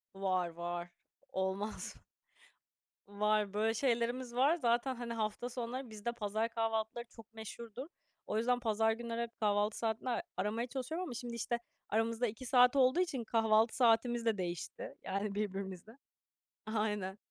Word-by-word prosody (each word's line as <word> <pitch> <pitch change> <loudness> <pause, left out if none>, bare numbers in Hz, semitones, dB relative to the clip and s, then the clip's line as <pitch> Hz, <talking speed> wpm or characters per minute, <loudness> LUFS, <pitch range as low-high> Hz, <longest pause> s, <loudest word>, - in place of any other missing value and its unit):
Var, 185 -2 +1
var. 175 +1 -4 0.4
Olmaz 190 +3 -2
mı? - - -20 1.1
Var. 210 0 +1
Böyle 220 +2 +2
şeylerimiz 240 0 0
var. 280 +6 +5
Zaten, 250 -2 +2
hani, 235 -1 -4
hafta 220 +2 -2
sonları 245 +1 -4
bizde 215 +2 -3
pazar 220 0 -1
kahvaltıları 225 +1 -1
çok 225 -1 -14
meşhurdur. 230 +4 -7 0.4
O 215 - 0
yüzden 245 +2 +3
pazar 220 -1 +2
günleri 235 0 -3
hep 235 0 -4
kahvaltı 205 0 +2
saatinde 225 +2 -1
a 235 - +1 0.2
aramaya 225 +4 0
çalışıyorum 280 +8 -3
ama 280 - -4
şimdi, 240 0 -5
işte, 235 +1 -1 0.3
aramızda 225 +2 +2
2 225 +4 -6
saat 250 0 +6
olduğu 265 +4 +5
için 275 -10 0
kahvaltı 225 0 +3
saatimiz 235 -1 +4
de 220 -3 +3
değişti, 175 -2 -4
yani, 200 +1 -2
birbirimizle. 195 +2 -4 0.7
Aynen. 210 -3 -1
225 Hz, 145 wpm, -35 LUFS, 210-240 Hz, 1.1 s, saat